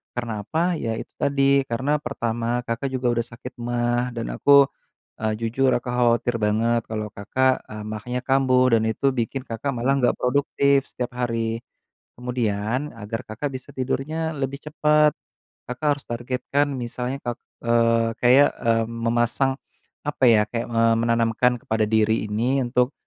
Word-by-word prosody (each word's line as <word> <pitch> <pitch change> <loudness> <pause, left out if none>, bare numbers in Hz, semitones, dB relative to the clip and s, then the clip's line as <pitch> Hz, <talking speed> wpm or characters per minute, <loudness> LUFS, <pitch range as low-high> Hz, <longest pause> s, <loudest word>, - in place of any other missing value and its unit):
Karena 115 -4 -3
apa, 170 - 0
ya 115 -1 -2
itu - - -7
tadi 140 0 +3
karena 130 +6 0
pertama 120 -2 -2
Kakak 120 +4 -2
juga 130 -1 -1
udah 120 - +2
sakit 120 +1 -10
maag 120 +1 0
dan 115 - -3
aku, 140 -1 +6 0.6
eee, 110 0 0
jujur 130 +3 +1
aku 125 - -3
khawatir 120 -1 +2
banget 115 +2 +1
kalau 110 -1 -4
Kakak, 130 +6 0
eee, 105 0 -8
maagnya 110 +4 -4
kambuh 130 -2 +4
dan 110 - +1
itu 110 +5 +1
bikin 130 +1 -2
Kakak 115 +5 -3
malah 125 +4 +1
nggak 125 - +3
produktif 140 +1 +2
setiap 125 -1 -5
hari. 115 -2 -1 0.6
Kemudian 125 +2 -2
agar 115 0 -5
Kakak 110 +7 -3
bisa 130 -1 -8
tidurnya 155 +5 -2
lebih 140 +1 -3
cepet, 150 -1 +3 0.6
Kakak 125 +5 -4
harus - - -14
targetkan 125 +4 -1
misalnya 125 +2 -4
ka 120 - -1 0.3
eee, 115 -1 +3
kayak, 130 +4 +6
eee, 115 -1 +2
memasang, 120 +3 0 0.5
apa 145 -3 -1
ya, 105 -2 +5
kayak, 115 -1 -3
eee, 115 0 +3
menanamkan 115 +1 +2
kepada 110 0 0
diri 110 0 +2
ini 120 +6 +1
untuk, 125 +2 +1
120 Hz, 150 wpm, -23 LUFS, 115-135 Hz, 0.6 s, aku